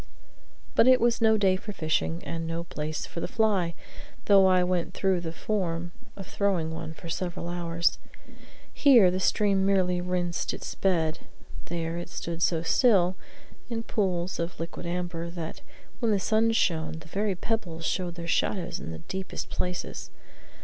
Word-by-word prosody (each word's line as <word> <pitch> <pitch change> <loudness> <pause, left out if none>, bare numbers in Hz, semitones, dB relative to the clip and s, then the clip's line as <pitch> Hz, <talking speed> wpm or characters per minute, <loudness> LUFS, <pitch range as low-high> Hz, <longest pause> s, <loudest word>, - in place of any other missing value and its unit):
But 230 - +5
it 255 0 +7
was 235 0 +2
no 220 -1 +5
day 195 -3 +3
for 210 +2 -6
fishing, 165 0 -1
and 165 0 -4
no 165 +1 -3
place 155 -2 -4
for - - -7
the - - -2
fly, 200 -7 +1 0.5
though 195 -2 +6
I 185 -1 +4
went 180 -1 -1
through 190 -2 +1
the 165 -1 -4
form 175 -3 -2 0.3
of 195 - -7
throwing 180 -6 0
one 160 0 -6
for 170 - -10
several 175 0 -3
hours. 170 -1 0 0.7
Here 240 -11 +6
the 185 - -1
stream 195 0 +2
merely 185 -2 +2
rinsed 175 -1 -1
its - - -6
bed, 165 -5 +1 0.5
there 165 0 -3
it 175 - -7
stood 170 0 -5
so 165 -2 +2
still, 185 -2 +4 0.5
in 225 -1 -3
pools 185 -5 -1
of 170 +1 -3
liquid 165 +1 -5
amber, 175 -1 -3
that, 170 -2 -6 0.4
when 230 -3 +1
the 205 - +2
sun 220 +4 +2
shone, 165 -8 +1
the 160 0 -9
very 200 +3 -1
pebbles 180 -5 -3
showed 175 0 -1
their 170 -1 -6
shadows 180 +2 0
in - - -7
the 80 - -5
deepest 190 0 -5
places. 180 0 -3
180 Hz, 165 wpm, -27 LUFS, 170-195 Hz, 0.7 s, it